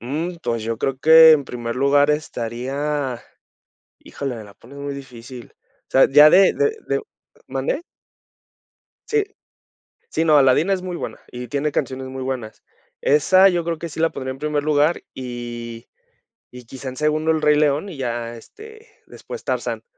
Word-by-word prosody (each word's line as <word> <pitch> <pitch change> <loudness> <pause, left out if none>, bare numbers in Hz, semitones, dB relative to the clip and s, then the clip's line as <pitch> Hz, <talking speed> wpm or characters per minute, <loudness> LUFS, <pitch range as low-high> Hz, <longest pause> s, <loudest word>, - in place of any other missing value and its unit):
Mm, 155 - -4
pues 115 -1 -2
yo 115 +1 -3
creo 135 +1 -2
que, 160 +3 +8
en 145 -3 +2
primer 120 -2 -5
lugar 145 +2 +3
estaría 135 0 -3 0.8
Híjole, 135 -3 -6
me 110 - -8
la 100 -1 -15
pones 130 +7 -15
muy 140 0 -5
difícil. 125 -2 -11 0.3
O - - -67
sea, 135 - +5
ya 150 +2 +8
de 190 +4 +5
de 440 0 0
de - - 0 0.5
¿Mande? - - -2 1.3
Sí. 440 -2 +1 0.9
Sí, - - 0
no, 155 -2 +5
Aladdin 140 +6 +4
es 190 -1 0
muy 180 -1 -5
buena, - - -6
y 125 0 -8
tiene 145 +3 -1
canciones 130 0 -3
muy 130 0 -6
buenas. 125 -5 -5 0.4
Esa 185 +7 +5
yo 175 -2 -1
creo 165 -1 -2
que 170 +2 -6
sí 155 - -9
la 165 0 +3
pondría 130 0 -5
en 130 - -9
primer 150 -1 -1
lugar, 150 +2 +1
y 120 -2 -7 0.6
y 125 0 -11
quizá 130 +3 -9
en 130 - -9
segundo 155 +2 +1
El 160 - 0
Rey 150 0 +4
León, 150 +5 +1
y 165 - -9
ya 120 -2 -4
este, 440 - -14 0.2
después 480 -1 -10
Tarzán. - - -3
140 Hz, 170 wpm, -21 LUFS, 125-160 Hz, 1.3 s, que